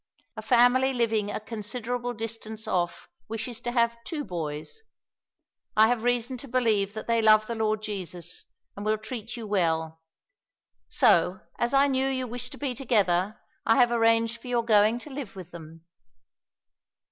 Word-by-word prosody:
"A 220 Hz, -, -6 dB
family 245 Hz, +3 st, +4 dB
living 220 Hz, -3 st, +1 dB
a 210 Hz, -, -3 dB
considerable 240 Hz, +3 st, -4 dB
distance 220 Hz, -1 st, -5 dB
off 175 Hz, -1 st, -1 dB, 0.2 s
wishes 225 Hz, +2 st, -5 dB
to 240 Hz, -1 st, -3 dB
have 235 Hz, -1 st, +1 dB
two 305 Hz, 0 st, -4 dB
boys. 160 Hz, -, -5 dB, 1.0 s
I 220 Hz, +1 st, +7 dB
have 245 Hz, -2 st, +1 dB
reason 245 Hz, +1 st, 0 dB
to 275 Hz, -, -9 dB
believe 220 Hz, -5 st, +1 dB
that 215 Hz, -, -5 dB
they 230 Hz, -1 st, +2 dB
love 215 Hz, 0 st, +6 dB
the 235 Hz, -, -4 dB
Lord 215 Hz, -1 st, -1 dB
Jesus, 180 Hz, -5 st, -2 dB, 0.3 s
and 205 Hz, -, -7 dB
will 215 Hz, +1 st, +1 dB
treat 225 Hz, +2 st, -7 dB
you 230 Hz, -, -6 dB
well. 160 Hz, -5 st, 0 dB, 0.9 s
So, 185 Hz, -, +3 dB, 0.2 s
as 235 Hz, -, +1 dB
I 275 Hz, +1 st, +6 dB
knew 265 Hz, -1 st, +1 dB
you 260 Hz, -1 st, -1 dB
wished 245 Hz, +1 st, -5 dB
to -, -, -10 dB
be 275 Hz, -3 st, -2 dB
together, 205 Hz, -6 st, +1 dB, 0.2 s
I 225 Hz, -, +4 dB
have 245 Hz, -2 st, +4 dB
arranged 230 Hz, 0 st, +2 dB
for -, -, -11 dB
your 240 Hz, -2 st, 0 dB
going 215 Hz, 0 st, +4 dB
to 280 Hz, +5 st, -10 dB
live 265 Hz, -8 st, -7 dB
with 180 Hz, -2 st, -10 dB
them." 165 Hz, -1 st, -12 dB
225 Hz, 165 wpm, -27 LUFS, 205-245 Hz, 1.0 s, I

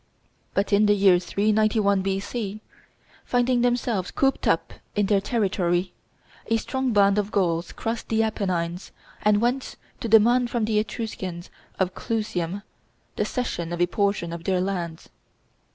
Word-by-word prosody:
But 200 Hz, +1 st, +1 dB
in 210 Hz, +1 st, +5 dB
the 205 Hz, -, +5 dB
year 195 Hz, -3 st, +5 dB
391 210 Hz, +1 st, +2 dB
B.C., 195 Hz, +2 st, -3 dB, 0.6 s
finding 245 Hz, 0 st, +1 dB
themselves 240 Hz, -6 st, 0 dB
cooped 270 Hz, 0 st, 0 dB
up -, -, +1 dB, 0.2 s
in 205 Hz, -1 st, +2 dB
their 195 Hz, 0 st, +2 dB
territory, 185 Hz, -5 st, 0 dB, 0.5 s
a 225 Hz, -, +2 dB
strong 260 Hz, +3 st, -2 dB
band 200 Hz, -1 st, +4 dB
of 205 Hz, 0 st, -1 dB
Gauls 170 Hz, -3 st, 0 dB
crossed 225 Hz, 0 st, -4 dB
the 225 Hz, 0 st, +2 dB
Apennines, 180 Hz, -5 st, -2 dB, 0.3 s
and 210 Hz, -1 st, +3 dB
went 250 Hz, +3 st, -1 dB, 0.2 s
to 230 Hz, -, -4 dB
demand 240 Hz, +3 st, +5 dB
from 235 Hz, -2 st, 0 dB
the 215 Hz, -1 st, +2 dB
Etruscans 190 Hz, -6 st, -5 dB, 0.3 s
of 185 Hz, -1 st, 0 dB
Clusium 200 Hz, -5 st, -3 dB, 0.5 s
the -, -, 0 dB
cession 175 Hz, -10 st, -3 dB
of 175 Hz, -, -3 dB
a 175 Hz, -, +4 dB
portion 195 Hz, -2 st, -1 dB
of 170 Hz, 0 st, -7 dB
their 185 Hz, -1 st, +1 dB
lands. 175 Hz, -4 st, -3 dB
205 Hz, 145 wpm, -25 LUFS, 185-225 Hz, 0.6 s, in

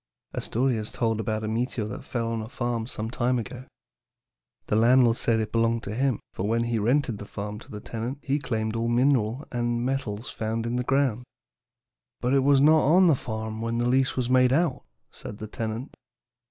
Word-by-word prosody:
"A -, -, -2 dB
story 125 Hz, +1 st, 0 dB
is 105 Hz, 0 st, -4 dB
told 115 Hz, -2 st, 0 dB
about 110 Hz, 0 st, -2 dB
a -, -, -2 dB
meteor 115 Hz, 0 st, -1 dB
that 105 Hz, -, -6 dB
fell 115 Hz, -2 st, -2 dB
on 115 Hz, -1 st, -2 dB
a 110 Hz, -, -7 dB
farm 120 Hz, -2 st, -2 dB
some 110 Hz, -2 st, -5 dB
time 125 Hz, +1 st, +1 dB
ago. 120 Hz, +3 st, -6 dB, 1.0 s
The -, -, 0 dB
landlord 120 Hz, +1 st, +5 dB
said 115 Hz, -2 st, +1 dB
it 110 Hz, -1 st, -2 dB
belonged 115 Hz, 0 st, +1 dB
to 100 Hz, -, -5 dB
him, 130 Hz, 0 st, +1 dB
for 95 Hz, -, -2 dB
when 115 Hz, +2 st, +1 dB
he 120 Hz, -1 st, 0 dB
rented 120 Hz, 0 st, +1 dB
the 100 Hz, -, -8 dB
farm 105 Hz, +1 st, -5 dB
to -, -, -15 dB
the 105 Hz, -, -7 dB
tenant 120 Hz, +5 st, -4 dB
he 140 Hz, +2 st, 0 dB
claimed 110 Hz, -4 st, -2 dB
all 115 Hz, 0 st, 0 dB
minerals 120 Hz, 0 st, +2 dB
and 120 Hz, -1 st, -1 dB
metals 125 Hz, -4 st, -3 dB
found 115 Hz, +1 st, -2 dB
in 120 Hz, +1 st, -1 dB
the 125 Hz, -, 0 dB
ground. 130 Hz, -3 st, +1 dB, 1.0 s
"'But 125 Hz, +2 st, 0 dB
it 140 Hz, -, +5 dB
was 140 Hz, 0 st, +5 dB
not 155 Hz, +2 st, +6 dB
on 180 Hz, +6 st, +5 dB
the 165 Hz, -4 st, +5 dB
farm 110 Hz, -2 st, -5 dB
when 115 Hz, 0 st, -1 dB
the 120 Hz, 0 st, +1 dB
lease 130 Hz, +1 st, +2 dB
was 125 Hz, -2 st, 0 dB
made 125 Hz, 0 st, +4 dB
out,' 155 Hz, 0 st, +1 dB, 0.3 s
said 100 Hz, -, -8 dB
the 110 Hz, -, -6 dB
tenant. 110 Hz, +4 st, -5 dB
120 Hz, 205 wpm, -26 LUFS, 110-130 Hz, 1.0 s, not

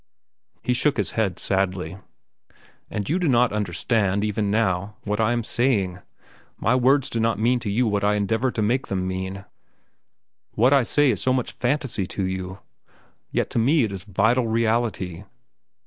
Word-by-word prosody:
He 125 Hz, -, +1 dB
shook 140 Hz, +3 st, +1 dB
his 105 Hz, -3 st, 0 dB
head 100 Hz, -6 st, -1 dB
sadly. 95 Hz, -1 st, -1 dB, 0.9 s
"And 100 Hz, -2 st, -4 dB
you 170 Hz, +5 st, +1 dB
do 175 Hz, -4 st, +1 dB
not 120 Hz, -3 st, +3 dB
understand, 100 Hz, 0 st, 0 dB
even 105 Hz, -1 st, -1 dB
now, 100 Hz, -1 st, 0 dB
what 105 Hz, 0 st, -2 dB
I 110 Hz, +1 st, +2 dB
am 120 Hz, -1 st, 0 dB
saying. 105 Hz, -7 st, 0 dB, 0.6 s
My -, -, +1 dB
words 130 Hz, +2 st, +3 dB
do 115 Hz, -, -3 dB
not 115 Hz, -1 st, +1 dB
mean 120 Hz, +4 st, +2 dB
to 115 Hz, -, -4 dB
you 115 Hz, +5 st, +1 dB
what 100 Hz, -1 st, 0 dB
I 105 Hz, 0 st, +3 dB
endeavor 110 Hz, +5 st, 0 dB
to 110 Hz, -3 st, -2 dB
make 125 Hz, +5 st, 0 dB
them 95 Hz, -1 st, -2 dB
mean. 95 Hz, +1 st, -4 dB, 1.1 s
What 125 Hz, +5 st, +4 dB
I 140 Hz, -, +6 dB
say 140 Hz, +3 st, +3 dB
is 105 Hz, -, -3 dB
so 130 Hz, -, +2 dB
much 125 Hz, -2 st, -1 dB
fantasy 125 Hz, -7 st, -1 dB
to 100 Hz, -, -3 dB
you. 95 Hz, 0 st, -4 dB, 0.7 s
Yet -, -, -1 dB
to -, -, 0 dB
me 140 Hz, +5 st, +3 dB
it 110 Hz, -, -1 dB
is 95 Hz, -2 st, -6 dB
vital 110 Hz, +5 st, +1 dB
reality. 110 Hz, -6 st, 0 dB
110 Hz, 175 wpm, -23 LUFS, 100-120 Hz, 1.1 s, I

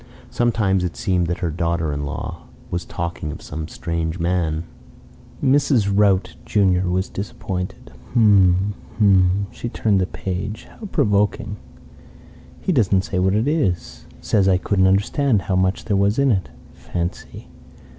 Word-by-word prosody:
Sometimes 105 Hz, -6 st, +1 dB
it 90 Hz, -1 st, -3 dB
seemed 90 Hz, -4 st, +1 dB
that 85 Hz, -, -3 dB
her 85 Hz, -, -1 dB
daughter 85 Hz, -1 st, -1 dB
in 70 Hz, 0 st, -3 dB
law -, -, -6 dB, 0.2 s
was 90 Hz, 0 st, -2 dB
talking 85 Hz, -3 st, -4 dB
of -, -, -8 dB
some 75 Hz, +1 st, -6 dB
strange 85 Hz, 0 st, -3 dB
man. 85 Hz, -2 st, 0 dB, 0.8 s
Mrs. 130 Hz, -6 st, +3 dB
Rout 100 Hz, -2 st, +3 dB
junior 95 Hz, -3 st, +2 dB
was 95 Hz, +1 st, 0 dB
disappointed. 95 Hz, -6 st, -5 dB, 0.2 s
"H'm. 100 Hz, -3 st, +4 dB, 0.2 s
H'm." 100 Hz, -2 st, +4 dB
She 120 Hz, -, -5 dB
turned 105 Hz, -4 st, +1 dB
the 90 Hz, -, 0 dB
page. 95 Hz, +4 st, -5 dB
"How 215 Hz, -, -6 dB
provoking! 105 Hz, -, +1 dB, 1.0 s
He -, -, 0 dB
doesn't 100 Hz, -, +3 dB
say 95 Hz, -1 st, -2 dB
what 95 Hz, +2 st, +2 dB
it 110 Hz, +5 st, +1 dB
is. 140 Hz, -, -1 dB
Says 100 Hz, -3 st, +2 dB
I 95 Hz, -1 st, +4 dB
couldn't 95 Hz, 0 st, +2 dB
understand 105 Hz, +3 st, +2 dB
how 95 Hz, -, -1 dB
much 95 Hz, +1 st, +1 dB
there 105 Hz, -2 st, 0 dB
was 100 Hz, +2 st, +2 dB
in 140 Hz, -1 st, +3 dB
it. 95 Hz, -5 st, 0 dB, 0.2 s
Fancy! 85 Hz, 0 st, -6 dB
95 Hz, 145 wpm, -21 LUFS, 90-105 Hz, 1.0 s, H'm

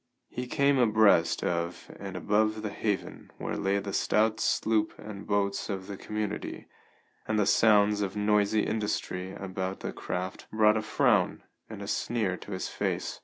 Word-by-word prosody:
He 125 Hz, 0 st, -4 dB
came 140 Hz, +1 st, +3 dB
abreast 110 Hz, -8 st, +4 dB
of 85 Hz, 0 st, -2 dB
and 95 Hz, -2 st, -6 dB
above 110 Hz, +2 st, +1 dB
the 105 Hz, -, -3 dB
haven 100 Hz, -1 st, -3 dB
where -, -, -3 dB
lay 100 Hz, +1 st, +1 dB
the 100 Hz, 0 st, -4 dB
stout 110 Hz, +2 st, +2 dB
sloop 110 Hz, -1 st, +1 dB
and 105 Hz, -2 st, -9 dB
boats 100 Hz, 0 st, 0 dB
of 95 Hz, -2 st, -3 dB
the 100 Hz, -, -6 dB
community, 105 Hz, +1 st, -4 dB, 0.6 s
and 110 Hz, -, 0 dB
the 105 Hz, -, +3 dB
sounds 105 Hz, -1 st, +4 dB
of 100 Hz, -1 st, -2 dB
noisy 105 Hz, 0 st, +2 dB
industry 100 Hz, -3 st, -2 dB
about 95 Hz, -1 st, -4 dB
the -, -, -4 dB
craft 90 Hz, +1 st, -5 dB
brought 110 Hz, 0 st, +4 dB
a 110 Hz, -, +1 dB
frown 110 Hz, -, +2 dB, 0.3 s
and -, -, -7 dB
a -, -, -7 dB
sneer 110 Hz, -6 st, -1 dB
to -, -, -11 dB
his 95 Hz, -, -3 dB
face. -, -, -3 dB
105 Hz, 165 wpm, -29 LUFS, 95-110 Hz, 0.6 s, abreast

